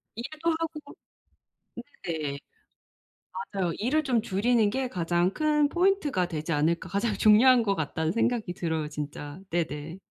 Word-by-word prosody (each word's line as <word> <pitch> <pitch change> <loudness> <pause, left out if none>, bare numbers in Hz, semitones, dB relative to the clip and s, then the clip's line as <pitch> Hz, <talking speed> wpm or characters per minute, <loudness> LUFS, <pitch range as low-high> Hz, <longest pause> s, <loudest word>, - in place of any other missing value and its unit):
일도 310 +8 -2
하고 315 -3 -6 1.1
네. 155 -4 -3 1.2
맞아요. 185 -4 0
일을 285 +8 +1
좀 250 -5 +1
줄이는 220 +2 +2
게 260 +3 -2
가장 175 -1 +1
큰 300 -1 +2
포인트가 345 - +1
되지 160 -1 -4
않을까. 160 +3 +1
가장 205 +3 0
중요한 230 +4 +6
것 200 -2 +1
같다는 160 0 -1
생각이 230 -2 0
들어요 160 -3 -2
진짜. 145 +1 -6
네네. 160 0 -3
200 Hz, 275 characters per minute, -27 LUFS, 165-255 Hz, 1.2 s, 중요한